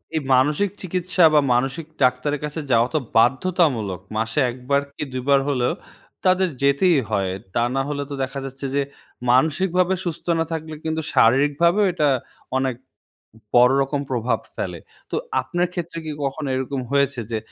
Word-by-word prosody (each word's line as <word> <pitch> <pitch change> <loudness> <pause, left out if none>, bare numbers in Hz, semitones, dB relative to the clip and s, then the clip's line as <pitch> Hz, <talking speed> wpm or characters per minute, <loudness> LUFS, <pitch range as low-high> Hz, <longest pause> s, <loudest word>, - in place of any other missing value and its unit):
এই 155 - +1
মানসিক 150 +10 +2
চিকিৎসা 185 0 0
বা, 150 - +7
মানসিক 135 +6 -1 0.2
ডাক্তারের 130 +3 +1
কাছে 150 +2 -5
যাওয়া 115 +1 +4
তো 155 - +2 0.2
বাধ্যতামূলক। 130 - +2 0.2
মাসে 115 +6 -1
১ 120 - -7
বার 140 0 +4
কি - - -4
২ 130 - -2
বার 140 -1 +5
হলেও 125 -3 +1 0.5
তাদের 185 0 +3
যেতেই 140 +4 +4
হয়। 100 -3 0 0.2
তা 120 - +3
না 135 - +2
হলে 145 -1 -2
তো - - -5
দেখা 135 +1 -4
যাচ্ছে 135 +1 -7
যে 140 - +3 0.5
মানসিকভাবে 175 +7 +2
সুস্থ 170 -2 -4
না 165 - +1
থাকলে, 160 -1 -4
কিন্তু 160 0 -1
শারীরিকভাবেও 145 - +4
এটা 150 -3 +2 0.5
অনেক 130 -2 -1
ব - - -46 0.7
বড় 125 +2 +7
রকম 140 +1 -2
প্রভাব 120 -2 0 0.2
ফেলে। - - -4 0.3
তো - - -1 0.2
আপনার 175 0 -1
ক্ষেত্রে 170 -1 -4
কি 155 - -4
কখনো 140 +1 -3
এরকম 130 +1 -2
হয়েছে 140 -2 +2
যে 110 - -1
140 Hz, 165 wpm, -22 LUFS, 130-165 Hz, 0.7 s, বা